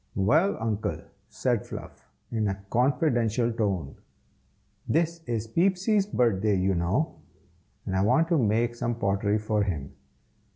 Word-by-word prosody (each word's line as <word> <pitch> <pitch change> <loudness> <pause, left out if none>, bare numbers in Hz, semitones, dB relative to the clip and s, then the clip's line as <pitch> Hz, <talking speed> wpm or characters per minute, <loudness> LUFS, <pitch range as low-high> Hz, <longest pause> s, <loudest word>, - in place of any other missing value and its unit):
"Well, 155 - +3
Uncle," 110 -2 -2 0.3
said - - 0
Fluff, - - -9 0.2
in 110 -2 0
a 95 0 -4
confidential 120 -3 +2
tone, 95 - -2 0.9
"this 165 +1 +1
is 115 -2 -1
Peepsy's 195 - +2
birthday, 110 - +2
you 95 +1 +1
know, 95 - 0 0.7
and 95 - -2
I 95 - +2
want 160 +11 +3
to 170 - +3
make 115 +1 +1
some 120 0 -2
pottery 100 -1 +1
for 105 0 0
him. 80 -9 -3
115 Hz, 130 wpm, -27 LUFS, 100-140 Hz, 0.9 s, Well